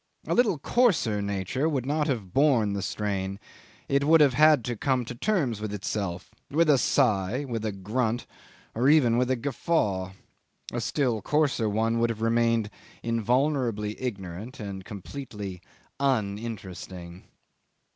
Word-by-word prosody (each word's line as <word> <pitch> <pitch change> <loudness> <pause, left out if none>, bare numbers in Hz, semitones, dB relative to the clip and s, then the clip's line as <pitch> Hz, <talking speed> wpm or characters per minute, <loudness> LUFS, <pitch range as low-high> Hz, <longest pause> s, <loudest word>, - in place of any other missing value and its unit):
A - - -1
little 220 -8 +3
coarser 145 - +2
nature 100 - -1
would 135 -5 -1
not 150 +2 0
have 110 - -3
borne 130 -8 +3
the 100 - -2
strain; 100 -1 -3 0.5
it 140 0 +2
would 160 +3 +6
have 145 -4 +5
had 150 -3 +5
to 120 - -2
come 130 +1 0
to 125 - -6
terms 130 - 0
with 110 -1 -3
itself 100 -3 -4 0.2
with 155 +1 +3
a 140 - +4
sigh, 120 0 +1
with 115 -3 -3
a 110 - -1
grunt, 110 +5 -2 0.5
or 125 +5 +2
even 140 -7 +5
with 125 0 +1
a 130 - +3
guffaw; 115 - -1 0.6
a - - -1
still 125 -7 0
coarser 140 -4 +1
one 115 +2 +1
would 115 0 +2
have 110 -1 -4
remained 115 -2 +2 0.3
invulnerably 115 -2 0
ignorant 100 -1 -5
and 100 -3 -6
completely 105 -3 -7 0.4
uninteresting. 100 -7 -3
115 Hz, 145 wpm, -27 LUFS, 100-140 Hz, 0.6 s, would